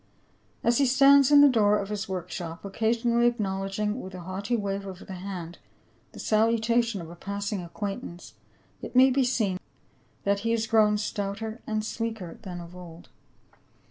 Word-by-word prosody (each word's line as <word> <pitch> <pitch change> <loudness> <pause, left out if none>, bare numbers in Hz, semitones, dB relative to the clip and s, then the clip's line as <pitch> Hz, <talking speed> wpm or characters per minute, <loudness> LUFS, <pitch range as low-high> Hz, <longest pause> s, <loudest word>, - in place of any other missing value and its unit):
As 235 +2 +3
he 275 - +4
stands 275 +2 +6
in 290 -1 +8
the 290 - +9
door 210 -5 +4
of 200 -1 -4
his 210 -1 -4
work 180 -2 -4
shop, 170 +1 -6
occasionally 235 +3 +1
acknowledging 210 0 -2
with 185 0 -9
a 180 - -7
haughty 195 +6 -3
wave 200 -2 -3
of 185 -1 -9
the 190 - -8
hand 180 -2 -7 0.5
the - - -11
salutation 230 0 +2
of 165 0 -9
a - - -10
passing 200 +2 -4
acquaintance, 175 -1 -6 0.5
it - - -8
may 260 +1 +7
be 265 +1 +2
seen 215 -7 0 0.6
that 200 0 +1
he 230 +3 -2
has 225 -1 0
grown 215 -2 +4
stouter 210 +2 -4
and 215 -1 -1
sleeker 220 -6 -5
than 180 -5 -7
of 170 +1 -10
old. 175 -2 -12
210 Hz, 170 wpm, -27 LUFS, 190-230 Hz, 0.6 s, the